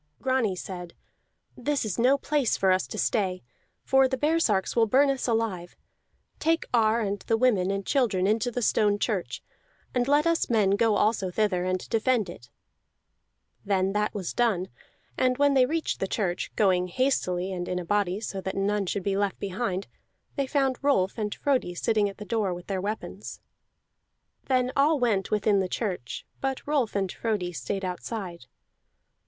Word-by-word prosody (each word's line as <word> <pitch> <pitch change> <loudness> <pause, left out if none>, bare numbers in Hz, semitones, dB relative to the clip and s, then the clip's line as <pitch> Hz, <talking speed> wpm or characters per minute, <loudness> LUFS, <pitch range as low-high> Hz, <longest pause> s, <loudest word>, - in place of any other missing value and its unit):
Grani 255 -6 +1
said: 180 -1 -7 0.6
"This 280 +1 -1
is 210 -1 -3
no 260 +4 +4
place 285 -3 0
for 190 -1 +3
us 185 0 +1
to - - -7
stay, 190 -4 0 0.4
for 265 0 +4
the 260 0 -2
baresarks 295 -9 +1
will 230 -1 +4
burn 275 +5 +4
us 270 -1 -3
alive. 220 -7 -1 0.6
Take 325 +1 +1
Ar 225 -1 +3
and 200 -1 -2
the 225 - 0
women 215 -7 +2
and 195 0 -2
children 225 -10 +1
into 220 +4 +1
the 245 0 -3
stone 205 -1 +3
church, 205 -4 -2 0.5
and 245 0 +1
let 290 +2 +3
us 335 0 +1
men 215 -5 +3
go 215 +1 +3
also 205 -2 +1
thither 185 -2 0
and 185 0 -2
defend 225 -4 +1
it." 120 -7 -14 1.1
Then 195 -1 +1
that 210 0 0
was 190 -4 -3
done; 205 -7 +1 0.5
and 255 -1 +2
when 285 0 +4
they 260 -2 +4
reached 325 +2 -2
the 195 - -1
church, 190 -3 -2
going 185 -3 +2
hastily 185 -5 0
and 175 -1 -4
in 180 - -1
a 180 - -4
body 200 0 0
so 195 -3 -5
that 190 +1 -4
none 200 0 0
should 195 +1 -2
be 195 0 0
left 200 -1 0
behind, 195 -1 -2 0.5
they 275 -2 -1
found 270 -2 +1
Rolf 200 -10 +2
and 210 -1 -2
Frodi 260 -11 0
sitting 210 +1 +1
at 195 - -11
the 210 - -8
door, 205 -3 -1
with 175 0 -10
their 190 -2 -2
weapons. 210 +3 -5 1.1
Then 255 -1 +1
all 295 +3 +4
went 215 -6 +1
within 210 -1 +2
the 190 -1 -1
church, 180 - -4
but 270 -1 -3
Rolf 280 -8 0
and 195 -2 0
Frodi 205 -6 -2
stayed 165 +8 -3
outside. 180 - -5
210 Hz, 175 wpm, -27 LUFS, 190-250 Hz, 1.1 s, no